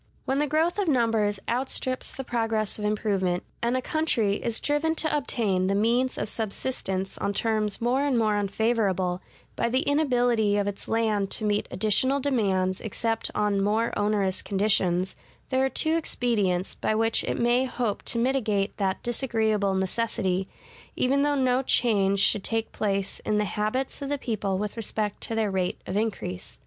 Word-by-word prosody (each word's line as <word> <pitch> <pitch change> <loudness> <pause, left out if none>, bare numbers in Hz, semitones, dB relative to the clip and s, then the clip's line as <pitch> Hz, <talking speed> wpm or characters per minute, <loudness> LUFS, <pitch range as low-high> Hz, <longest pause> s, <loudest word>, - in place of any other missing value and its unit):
When 270 +1 0
the 295 - +1
growth 320 +6 +1
of 400 - 0
numbers 225 -7 +2
outstrips 255 +1 -1
the 270 - -6
progress 225 -4 -1
of 210 - -3
improvement, 200 -4 0 0.2
and 235 +2 +1
a 255 - -3
country 235 -11 +1
is 230 -2 0
driven 305 +2 0
to 315 -2 +1
obtain 200 -10 0
the 195 - +1
means 240 +5 +2
of - - -2
subsistence 195 -3 -2
on 200 - -1
terms 215 -2 +1
more 245 +4 +1
and 280 -4 +1
more 215 -2 +2
unfavorable, 200 -3 0 0.3
by 235 - 0
the 255 +3 +2
inability 245 -8 +2
of 205 - +1
its 200 -1 -5
land 215 -3 +1
to 215 - -1
meet 210 0 0
additional 240 +7 +2
demands 195 -9 0
except 225 +1 -1
on 205 -2 +1
more 220 +3 +1
onerous 205 -3 0
conditions, 190 -3 +1 0.4
there 260 0 +2
are 265 - +2
two 315 +4 +1
expedients, 210 - 0
by 215 - -1
which 225 +1 +2
it - - -2
may 240 +2 +2
hope 240 -5 -2
to - - +1
mitigate 225 -5 0
that 190 -2 -1
disagreeable 220 -5 0
necessity, 190 -1 -1 0.5
even 275 +2 +2
though 290 0 +2
no 255 -1 +2
change 200 -7 +2
should 200 0 +2
take 225 0 -1
place 195 -2 -2
in 210 - -1
the 210 - +1
habits 215 +8 -2
of 280 - -4
the 290 - 0
people 205 -7 -2
with 210 +1 -3
respect 215 -2 -2
to 225 - -3
their 220 -2 0
rate 185 -2 -1
of 185 - -4
increase. 200 - -3
220 Hz, 170 wpm, -26 LUFS, 200-250 Hz, 0.5 s, numbers